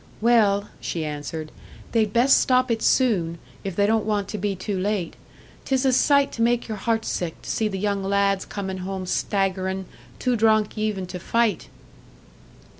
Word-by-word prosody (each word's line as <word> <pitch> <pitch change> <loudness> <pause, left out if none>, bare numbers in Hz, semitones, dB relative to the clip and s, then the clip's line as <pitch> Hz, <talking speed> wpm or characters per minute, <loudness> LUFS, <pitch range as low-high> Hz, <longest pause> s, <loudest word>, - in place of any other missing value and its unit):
"Well," 210 -3 +3
she 165 -2 -3
answered, 155 +1 -5 0.4
"they'd 220 -3 +2
best 245 +5 +5
stop 255 -1 +2
it 225 -1 0
soon, 185 -10 +2 0.3
if 195 -3 -4
they 200 - +3
don't 220 +1 +2
want 210 -2 -1
to 210 - -4
be 200 0 -1
too 190 +1 -3
late. 195 -2 -1 0.5
'Tis 265 0 +1
a 260 - +4
sight 280 +2 +4
to 230 - -5
make 240 +1 +2
your 215 -2 -4
heart 225 +2 -1
sick 170 -3 -3
to - - -8
see 220 - 0
the 195 -2 -4
young 200 0 -1
lads 195 0 +1
comin' 190 -2 -5
home 190 0 -4
staggerin', 190 0 -1 0.3
too 250 -1 0
drunk 215 -1 +2
even 215 -3 -2
to 180 0 -7
fight." 225 0 0
205 Hz, 175 wpm, -24 LUFS, 190-225 Hz, 0.5 s, best